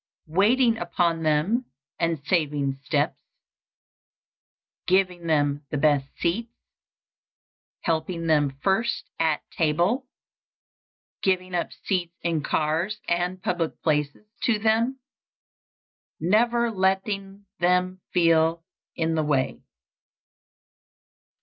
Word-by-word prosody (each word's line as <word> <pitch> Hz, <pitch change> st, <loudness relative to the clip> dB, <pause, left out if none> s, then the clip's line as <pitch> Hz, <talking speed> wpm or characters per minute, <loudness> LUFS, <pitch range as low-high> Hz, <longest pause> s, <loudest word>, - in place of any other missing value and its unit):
_ -, -, -14 dB
Waiting 230 Hz, +4 st, +4 dB
upon 170 Hz, -1 st, 0 dB
them 160 Hz, +11 st, +1 dB, 0.3 s
and 165 Hz, -4 st, -1 dB
saving 145 Hz, -6 st, 0 dB
steps. -, -, 0 dB, 1.7 s
Giving 180 Hz, -2 st, +2 dB
them 145 Hz, -2 st, +1 dB
the 150 Hz, -, -2 dB
best 145 Hz, -2 st, +3 dB
seats. 220 Hz, +7 st, -1 dB, 1.3 s
Helping 165 Hz, 0 st, -1 dB
them 150 Hz, -3 st, +3 dB
first 200 Hz, +5 st, +1 dB
at 160 Hz, -2 st, +1 dB
table. 175 Hz, -, +1 dB, 1.1 s
Giving 185 Hz, -1 st, 0 dB
up 175 Hz, -, -1 dB
seats 175 Hz, -3 st, -1 dB
in 165 Hz, -2 st, 0 dB
cars 160 Hz, +8 st, 0 dB
and 175 Hz, +2 st, -1 dB
public 175 Hz, -3 st, -1 dB
places 150 Hz, +3 st, 0 dB, 0.2 s
to 230 Hz, -3 st, +2 dB
them. 225 Hz, +5 st, +1 dB, 1.2 s
_Never 230 Hz, +5 st, +2 dB
letting 195 Hz, +1 st, -1 dB
them 180 Hz, +1 st, +1 dB
feel 165 Hz, -1 st, +3 dB, 0.3 s
in 165 Hz, 0 st, 0 dB
the 160 Hz, -1 st, +1 dB
way. 140 Hz, -3 st, 0 dB
175 Hz, 95 wpm, -25 LUFS, 160-195 Hz, 1.7 s, Waiting